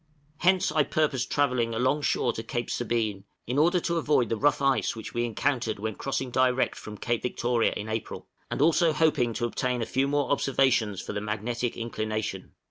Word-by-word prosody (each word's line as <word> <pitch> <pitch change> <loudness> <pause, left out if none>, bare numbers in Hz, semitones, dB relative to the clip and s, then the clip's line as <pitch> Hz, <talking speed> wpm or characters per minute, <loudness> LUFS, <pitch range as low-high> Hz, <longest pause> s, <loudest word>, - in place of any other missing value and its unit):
Hence 185 +2 +3
I 155 - +3
purposed 145 -4 0
travelling 125 -5 +1
alongshore 130 0 +1
to 115 - -4
Cape 120 +1 -4
Sabine, 110 -4 -1 0.2
in 125 +4 0
order 175 +4 +4
to 170 +1 -1
avoid 150 -6 +2
the 115 - +1
rough 145 +6 +2
ice 135 -3 +1
which 110 - -8
we 120 0 0
encountered 120 -1 -1
when 110 +2 -3
crossing 135 +2 -3
direct 130 0 +2
from 105 -1 -9
Cape 120 +1 -1
Victoria 120 -1 +1
in 105 - -5
April, 110 0 -4 0.2
and - - 0
also 165 0 +4
hoping 150 -7 +2
to 120 - -1
obtain 125 +1 -1
a 115 - -1
few 135 +4 0
more 145 0 0
observations 130 -7 +2
for - - -5
the 105 - -3
magnetic 110 +3 -3
inclination. 110 -3 -4
125 Hz, 185 wpm, -27 LUFS, 115-140 Hz, 0.2 s, order